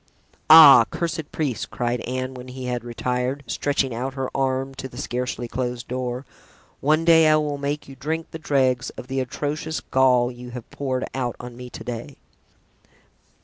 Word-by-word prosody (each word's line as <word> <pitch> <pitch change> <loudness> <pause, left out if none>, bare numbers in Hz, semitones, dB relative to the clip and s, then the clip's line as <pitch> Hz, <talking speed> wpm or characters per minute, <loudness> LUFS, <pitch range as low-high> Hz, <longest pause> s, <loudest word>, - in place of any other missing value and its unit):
"Ah, 150 -7 +10
cursed 165 -3 -3
priest!" 140 -8 -2
cried 120 -1 -2
Anne, 130 +1 -3
when 125 0 -9
he 130 0 -7
had 125 -2 -2
retired, 125 +3 -2
stretching 140 -3 -1
out 130 +3 -4
her 135 -1 -4
arm 135 0 0
to 135 - -6
the 120 - -13
scarcely 125 -2 -3
closed 125 0 -4
door, 125 +1 -3 0.5
"one 155 +3 +2
day 165 -1 +6
I 155 - +6
will 150 -2 -1
make 145 +1 -3
you 135 - -11
drink 160 +5 -4
the 160 - -7
dregs 130 -4 +1
of - - -7
the 135 +1 -2
atrocious 150 +4 -3
gall 125 -2 +3
you 125 0 -10
have 120 - -9
poured 130 -2 -2
out 125 -3 -2
on 120 -1 -8
me 125 0 -9
to - - -9
day." 120 -2 -6
130 Hz, 175 wpm, -23 LUFS, 125-145 Hz, 0.5 s, Ah